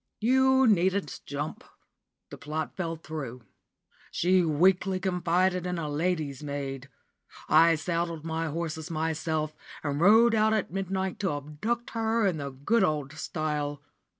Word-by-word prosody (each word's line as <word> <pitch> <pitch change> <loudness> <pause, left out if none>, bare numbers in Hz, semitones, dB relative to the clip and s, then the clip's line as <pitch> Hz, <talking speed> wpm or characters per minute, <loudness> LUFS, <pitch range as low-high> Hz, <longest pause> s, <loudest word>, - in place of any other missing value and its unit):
You 265 +3 +4
needn't 190 - +1
jump. 145 +2 -4 0.7
The - - -8
plot 155 +1 -4
fell 170 -3 -3
through. 145 -7 -7 0.7
She 185 +1 +3
weakly 185 +4 +2
confided 180 0 +1
in 180 -1 -2
a 160 -2 -3
lady's 150 -2 -1
maid. 140 -2 -5 0.6
I 165 +1 +6
saddled 165 0 -2
my 165 0 -2
horses 160 +1 -4
myself, 160 -1 -2 0.3
and 145 0 -2
rode 225 +5 +6
out 220 0 +3
at 215 -5 -1
midnight 190 -1 -2
to 190 -6 0
abduct 150 +12 -3
her 225 -1 +1
in 185 -5 +1
the 140 -2 -4
good 145 - +1
old 150 -5 -1
style. 150 -2 -3
165 Hz, 135 wpm, -28 LUFS, 150-190 Hz, 0.7 s, I